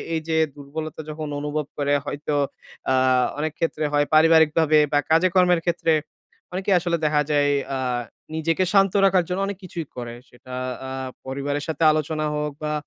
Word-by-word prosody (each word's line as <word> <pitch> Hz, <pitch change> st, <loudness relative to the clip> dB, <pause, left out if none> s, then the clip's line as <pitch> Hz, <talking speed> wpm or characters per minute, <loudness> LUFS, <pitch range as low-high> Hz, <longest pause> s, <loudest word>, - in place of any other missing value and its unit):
এইযে 160 Hz, 0 st, -1 dB, 0.2 s
দুর্বলতা 155 Hz, +2 st, -6 dB
যখন 155 Hz, 0 st, -5 dB
অনুভব 150 Hz, 0 st, -2 dB
করে 145 Hz, 0 st, +1 dB
হয়তো 145 Hz, +1 st, -3 dB, 0.6 s
আ -, -, +4 dB, 0.5 s
অনেক 155 Hz, 0 st, -1 dB
ক্ষেত্রে 160 Hz, -2 st, -1 dB
হয় 145 Hz, 0 st, +3 dB
পারিবারিকভাবে 160 Hz, -1 st, +5 dB
বা 145 Hz, -, +4 dB
কাজে 165 Hz, +3 st, +5 dB
কর্মের 180 Hz, -2 st, +4 dB
ক্ষেত্রে 170 Hz, -1 st, +1 dB, 0.6 s
অনেকেই 190 Hz, +1 st, +1 dB
আসলে 170 Hz, -1 st, 0 dB
দেখা 150 Hz, -1 st, +3 dB
যায় 145 Hz, -1 st, +3 dB, 0.2 s
আ -, -, -1 dB, 0.6 s
নিজেকে 165 Hz, +3 st, +1 dB
শান্ত 195 Hz, -2 st, +4 dB
রাখার 185 Hz, -2 st, +4 dB
জন্য 180 Hz, +2 st, -1 dB
অনেক 200 Hz, -2 st, -4 dB
কিছুই 170 Hz, -4 st, -6 dB
করে। 120 Hz, -1 st, -6 dB, 0.2 s
সেটা 125 Hz, +1 st, -13 dB, 0.3 s
আ -, -, -6 dB, 0.4 s
পরিবারের 140 Hz, +2 st, -3 dB
সাথে 160 Hz, 0 st, -2 dB
আলোচনা 155 Hz, 0 st, -1 dB
হোক 150 Hz, 0 st, -2 dB
বা 150 Hz, 0 st, -1 dB
155 Hz, 160 wpm, -23 LUFS, 145-165 Hz, 0.6 s, পারিবারিকভাবে